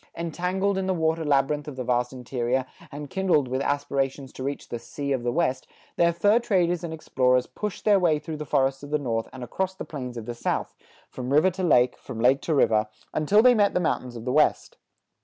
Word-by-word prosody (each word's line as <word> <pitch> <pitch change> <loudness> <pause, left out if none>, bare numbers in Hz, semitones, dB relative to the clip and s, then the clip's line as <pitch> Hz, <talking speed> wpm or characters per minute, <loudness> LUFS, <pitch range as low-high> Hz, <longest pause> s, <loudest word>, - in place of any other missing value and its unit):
Entangled 180 +4 -1
in 190 - -2
the 190 - +1
water 160 0 0
labyrinth 145 0 +1
of 145 - -6
the 130 - -4
vast 125 0 0
interior, 125 0 -2 0.3
and 145 0 -8
kindled 185 -8 +2
with 130 +2 -2
aspirations 140 -1 -2
to - - -9
reach 140 +2 -4
the 120 - -4
"Sea 140 +4 -5
of 130 -3 0
the 120 0 -1
West," 130 -4 0 0.3
their 170 0 +3
fur 205 +7 +3
traders 180 -7 +1
and 170 - -4
explorers 130 -5 +1
pushed 210 -3 -6
their 205 -2 +5
way 165 -4 +3
through 155 +1 -6
the 150 - -5
forests 135 -2 +1
of 145 - -9
the 150 - +1
North 115 -6 -2
and 130 -1 -8
across 190 +9 -3
the - - -7
plains 125 -5 -6
of 115 - -6
the 120 - -4
South, 115 - -2 0.4
from 125 0 -5
river 155 +6 +4
to 190 +2 -6
lake, 125 -8 +3
from 110 - -8
lake 130 +4 +4
to 160 - -1
river, 110 -5 +3 0.3
until 200 +8 +3
they 250 0 +7
met 205 -3 +2
the - - +3
mountains 130 -7 -2
of 115 0 -8
the 125 - -1
West. 150 - +2
145 Hz, 225 wpm, -25 LUFS, 125-175 Hz, 0.4 s, they